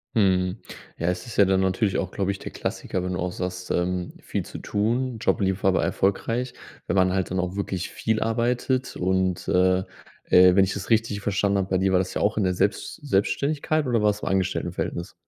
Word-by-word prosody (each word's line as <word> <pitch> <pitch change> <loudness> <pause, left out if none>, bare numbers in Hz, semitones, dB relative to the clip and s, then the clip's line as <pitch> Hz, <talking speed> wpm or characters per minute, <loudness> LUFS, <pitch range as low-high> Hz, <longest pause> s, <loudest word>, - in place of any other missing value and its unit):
Mhm, 95 -4 +2 0.4
ja, 85 - -1
es 90 0 -1
ist 115 - -8
ja 100 - +7
dann 95 0 +2
natürlich 95 +1 +1
auch, 95 - -2
glaube 100 -1 -1
ich, 100 - -1
der - - -8
Klassiker, 90 - -3
wenn 90 - -2
du 90 - -3
auch 90 +1 -1
sagst, 90 0 -5
ähm: 90 0 -1
„Viel - - -3
zu - - -8
tun. 120 +4 -1
Job 105 - 0
lief 95 0 0
aber 95 -1 +3
erfolgreich, 115 +6 0 0.3
wenn 85 - -1
man 95 -1 +3
halt 95 -2 -1
dann 95 - 0
auch 90 +1 -2
wirklich 95 -3 -3
viel 110 -1 -1
arbeitet." 125 +3 0
Und, 95 0 0
äh, 90 0 +3 0.5
äh, 90 0 +6
wenn 95 - +6
ich 95 - -3
es 100 +3 -6
richtig 110 -2 +2
verstanden 100 0 +1
habe, 95 -1 -1
bei 95 - +2
dir 95 0 +2
war 90 - +5
das 95 - -2
ja - - -2
auch 105 +1 +1
in 105 - +2
der 90 -1 +1
Selbst 100 +3 -1
Selbstständigkeit 145 - 0
oder 115 -3 +2
war 105 - +5
das 105 - -1
im - - -5
Angestelltenverhältnis? 95 -2 -2
95 Hz, 220 wpm, -25 LUFS, 90-110 Hz, 0.5 s, ja